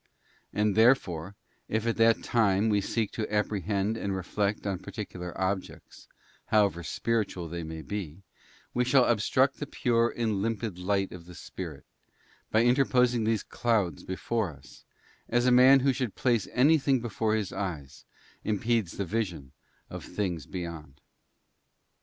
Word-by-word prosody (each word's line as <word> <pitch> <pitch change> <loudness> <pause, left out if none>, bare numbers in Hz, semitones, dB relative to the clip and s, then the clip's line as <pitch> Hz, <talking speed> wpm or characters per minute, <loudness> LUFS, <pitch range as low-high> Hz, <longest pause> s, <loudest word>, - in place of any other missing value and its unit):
And 105 -1 +1
therefore, 100 -7 +3 0.3
if 110 +1 -1
at 115 - +1
that 115 0 +4
time 110 -2 +2
we 105 -1 +2
seek 110 +1 -1
to 110 -2 -4
apprehend 105 0 0
and 100 -3 -2
reflect 100 +3 -2
on 100 -3 -2
particular 90 -3 -7
objects, 95 0 -4 0.4
however 100 -5 +2
spiritual 95 - -2
they 85 +1 -5
may 80 0 -7
be, 100 -4 -4
_ 80 +6 -16 0.5
we 125 - +2
shall 130 0 +4
obstruct 130 +4 +2
the 145 - -4
pure 120 -2 +1
and 110 -5 -1
limpid 110 -3 -2
light 95 +1 0
of 85 -2 -10
the 90 - -11
Spirit, 80 -4 -8 0.6
by 110 +1 +3
_ - - +2
interposing 125 -2 +3
these 110 -2 +1
clouds 105 -10 0
before 105 +2 -2
us, 70 -4 -15 0.4
as 120 +1 +2
a 125 - +4
man 130 +2 +7
who 135 0 +3
should 125 -6 -3
place 120 -6 +1
_ - - -13
anything 140 0 +4
before 110 -1 -1
his 105 -4 -2
eyes 80 -9 -5 0.4
impedes 110 -2 0
the 100 - -3
vision 90 -9 -3 0.4
of - - -7
things 90 -9 -3
beyond. 80 -6 -7
105 Hz, 155 wpm, -28 LUFS, 90-115 Hz, 0.6 s, man